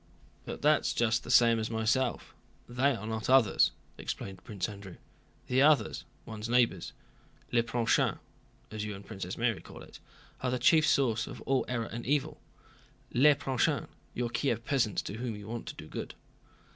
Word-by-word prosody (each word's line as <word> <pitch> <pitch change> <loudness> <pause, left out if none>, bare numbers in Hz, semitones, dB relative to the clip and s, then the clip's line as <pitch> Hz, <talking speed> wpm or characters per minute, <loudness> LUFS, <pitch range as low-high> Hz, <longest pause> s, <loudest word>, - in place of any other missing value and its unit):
"But - - -7
that's - - +3
just 115 0 +1
the - - -10
same 115 -2 +5
as 110 - -2
myself—they 120 +3 -1
are 110 -1 -7
not 110 +1 -3
others," 130 -6 +5 0.3
explained 95 -1 -6
Prince 100 -4 -3
Andrew. 100 -3 -9 0.5
"The 130 +1 +2
others, 150 0 +3 0.2
one's 110 0 -6
neighbors, 120 -1 +2 0.6
le 120 - +4
prochain, 115 0 +1 0.5
as 110 -1 -4
you 105 -1 -4
and 100 - -11
Princess 95 -4 -6
Mary 115 -3 0
call - - -12
it, - - -14 0.4
are 125 - 0
the 125 - 0
chief 155 +5 +4
source 115 -6 +2
of - - -8
all 135 -1 +1
error 120 -2 -2
and 120 +1 -7
evil. 145 0 0 0.7
Le 145 +4 +6
prochain—your 130 -3 -2
Kiev 120 -4 -1
peasants 125 -7 +1
to 105 - -6
whom 120 -2 -3
you 105 0 -10
want 115 +1 -6
to - - -6
do - - -10
good." - - -6
115 Hz, 165 wpm, -30 LUFS, 110-130 Hz, 0.7 s, Le